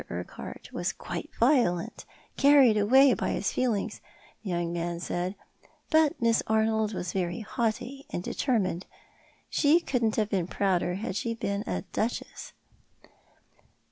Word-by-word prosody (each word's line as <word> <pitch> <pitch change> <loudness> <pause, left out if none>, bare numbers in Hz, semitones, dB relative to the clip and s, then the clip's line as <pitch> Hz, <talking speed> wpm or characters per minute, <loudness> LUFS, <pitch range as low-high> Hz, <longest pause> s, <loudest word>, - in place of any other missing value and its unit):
Urquhart - - -8
was - - -1
quite - - -6
violent 235 - +2 0.2
— - - -32
carried 275 -5 +6
away 255 +6 +6
by - - -1
his 200 - -1
feelings, 235 -6 -1 0.4
the 205 - -6
young 170 -1 -1
man 170 0 -3
said 180 +2 -3 0.3
— - - -32
but 315 -2 +3
Miss 230 -1 +3
Arnold 220 -1 +1
was 180 -1 -4
very 175 0 -2
haughty 240 +5 -3
and 175 - -4
determined; 195 - -1 0.6
she 300 +3 +4
couldn't 240 -9 0
have 215 -1 0
been 185 -4 0
prouder 185 -2 0
had 200 0 -4
she 230 +2 -2
been 200 -2 -2
a 90 -1 -2
duchess." 230 +3 -3
215 Hz, 140 wpm, -28 LUFS, 185-245 Hz, 0.6 s, carried